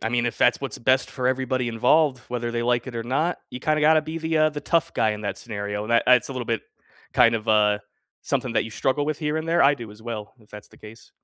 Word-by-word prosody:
I 115 - -2
mean, 120 -1 +1
if 115 - -4
that's 125 - +3
what's 135 - -5
best 130 +2 +2
for 125 -2 -3
everybody 130 -1 0
involved, 130 +4 +2
whether 120 -1 -3
they 120 0 -1
like 120 +1 0
it 125 - -7
or 115 - -3
not, 145 +9 -1
you 125 - -6
kinda 155 +3 0
gotta 155 +1 +5
be 160 +2 -5
the, 160 0 -1
uh, 155 0 +5
the 150 -1 -6
tough 165 +3 0
guy 110 - +2
in 105 0 -5
that 100 -1 -3
scenario, 105 -2 -5
and 115 - -7
tha 115 - +4
it's 125 +1 +5
a - - -5
little 125 -2 -4
bit 115 -2 -1 0.5
kind 115 0 +5
of, 110 0 -4
uh, 105 -1 +4 0.4
something - - -2
that - - +2
you 110 - -8
struggle 135 +6 0
with 155 -1 -2
here 150 -1 -2
and 160 +1 -3
there, 170 +1 +2
I 140 +1 +5
do 115 -5 -9
as 105 - -14
well, 110 -3 -6
if 105 - -23
that's 105 0 -11
the - - -19
case. 110 +1 -14
125 Hz, 280 wpm, -24 LUFS, 115-145 Hz, 0.5 s, gotta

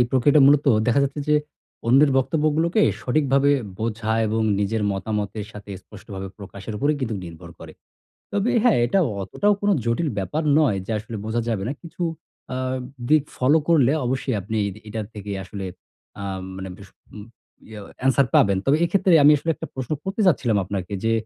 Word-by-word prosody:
এই 120 - +4
প্রক্রিয়াটা 135 +3 +4
মূলত 145 +1 +5 0.2
দেখা 120 +3 +3
যাচ্ছে 140 +2 -4
যে 150 - +5 0.5
অন্যের 135 +5 +5
বক্তব্যগুলোকে 155 - +1 0.2
সঠিকভাবে 140 +1 +2 0.3
বোঝা 110 0 -2
এবং 110 +1 -1 0.2
নিজের 105 +2 -1
মতামতের 105 +1 -3
সাথে 105 -1 -10
স্পষ্টভাবে 95 -2 -9
প্রকাশের 100 +1 -8
উপরেই 145 +1 +1
কিন্তু 115 -4 -2
নির্ভর 85 0 -10
করে। - - -10 0.6
তবে 205 +4 +1
হ্যাঁ, 240 - +4
এটা 130 - +1 0.2
অতটাও 205 - +1
কোন 205 - 0 0.2
জটিল 115 +8 0
ব্যাপার 95 - -2 0.2
নয়, 125 -11 +2
যে - - -6
আসলে 110 +2 -7
বোঝা 115 +2 -1
যাবে 110 -4 -1
না। - - -1
কিছু 170 +1 -8 0.5
আ - - -3 0.5
দিক 155 -1 +5
ফলো 140 +5 +4
করলে 145 -6 +4
অবশ্যই 130 0 -1
আপনি 110 +4 -4
এদি 100 - -8
এটার 105 -1 -4
থেকে 105 -1 -7
আসলে 95 +2 -7 0.6
আ - - -5 0.3
মানে 95 0 -6
ভিস 100 0 -13 0.3
উম 105 -1 -9 0.4
ইয়ে 110 -1 -9 0.2
অ্যানসার 135 +1 +3
পাবেন। 100 -1 +5
তবে 140 +2 +3
এক্ষেত্রে 185 0 +3
আমি 150 - +8
আসলে 165 +3 -2
একটা - - -7
প্রশ্ন 130 +1 -4
করতে 195 +3 -4
চাচ্ছিলাম 125 - +2
আপনাকে 95 0 -5
যে, 115 - +2
120 Hz, 170 wpm, -23 LUFS, 105-150 Hz, 0.6 s, আমি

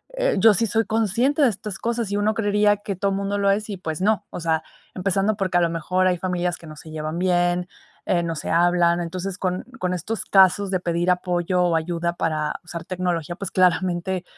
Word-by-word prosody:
eh, - - +1
yo 225 -2 +7
sí 225 +4 +1
soy 225 +3 +1
consciente 225 - +1
de 265 - +6
estas 205 -1 -6
cosas 230 -3 -2
y - - 0
uno 210 +1 +1
creería 205 -1 +2
que 205 -1 -5
todo 195 +2 0
mundo 200 +1 -1
lo 200 0 +2
es 210 +2 -1
y, 200 - -3
pues 160 -3 -4
no. 215 0 +1
O - - -6
sea, 160 -1 0 0.3
empezando 195 +3 +1
porque 185 -2 0
a 175 - +3
lo 170 - +2
mejor 180 +3 0
hay 180 -1 +2
familias 180 -1 -1
que 165 - -14
no 155 - -9
se 160 - -12
llevan 155 +1 -4
bien, 175 -1 +1 0.4
eh, 175 -1 +1
no 165 -1 -2
se - - -5
hablan, 175 0 +3
entonces, 185 +2 -4
con 185 -1 -2 0.2
con 180 0 -1
estos 205 +5 -3
casos 195 0 +4
de 185 - +1
pedir 175 +1 0
apoyo 180 0 0
o 175 -2 +2
ayuda 170 +1 -1
para 155 -3 -1
usar 170 -1 -7
tecnología, 175 -3 -2
pues 195 -1 -6
claramente, 180 0 +1
180 Hz, 215 wpm, -23 LUFS, 175-200 Hz, 0.4 s, yo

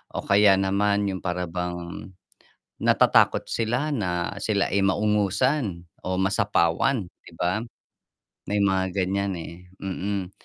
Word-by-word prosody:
O - - -3
kaya 100 0 +5
naman 100 +1 +1
yung 95 - -4
para 90 0 -2
bang 90 0 -5 0.7
natatakot - - +4
sila 120 +7 -1
na 90 -5 -2
sila 100 -2 +1
ay 100 - +2
maungusan 105 - +1 0.2
o 95 0 -1
masapawan, 100 +3 +1 0.2
'di - - -15
ba? 90 +6 0 0.9
May 105 0 +1
mga 95 -1 +1
ganyan, 100 +1 -1
eh, 85 - -8 0.3
mm. 95 0 -3
95 Hz, 120 wpm, -25 LUFS, 90-105 Hz, 0.9 s, kaya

